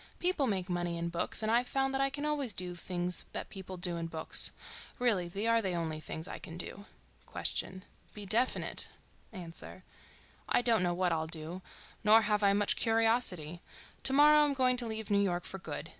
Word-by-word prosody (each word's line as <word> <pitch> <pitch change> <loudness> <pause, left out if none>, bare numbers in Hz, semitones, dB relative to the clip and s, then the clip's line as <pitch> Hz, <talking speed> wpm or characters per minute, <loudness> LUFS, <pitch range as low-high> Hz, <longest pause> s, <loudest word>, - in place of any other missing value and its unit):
People 350 -6 +1
make 190 -5 -1
money 175 -1 -2
in 170 0 -2
books 170 +5 -2
and 215 - +1
I've 240 +2 +3
found 270 0 0
that 270 - 0
I 275 - +2
can 290 +1 -4
always 285 -6 0
do 180 0 -2
the - - -9
things 180 -1 -2
that - - -5
people 190 -1 -8
do 175 -1 -1
in 165 0 -3
books. 160 -1 0 0.5
Really 220 -8 +1
they 200 +5 -4
are 230 0 +3
the 190 -4 -2
only 160 -2 -3
things 160 +1 -6
I - - -7
can 165 -1 -9
do. 200 +3 -5 0.5
Q.—Be 190 +2 -5
definite. 230 +6 +2 0.4
A.—I 180 +4 -5
don't 230 -4 +3
know 175 -1 +1
what 180 0 +1
I'll 160 -1 -1
do—nor 180 +6 0
have 210 0 +1
I 200 -1 +5
much 205 0 +2
curiosity. 225 -8 +1 0.4
To - - +4
morrow 300 +2 +7
I'm 295 -2 +3
going 255 -1 +3
to 240 -1 0
leave 220 -1 -4
New 200 0 +4
York 180 -3 0
for 195 - -6
good. 160 -1 -6
195 Hz, 190 wpm, -32 LUFS, 175-235 Hz, 0.5 s, morrow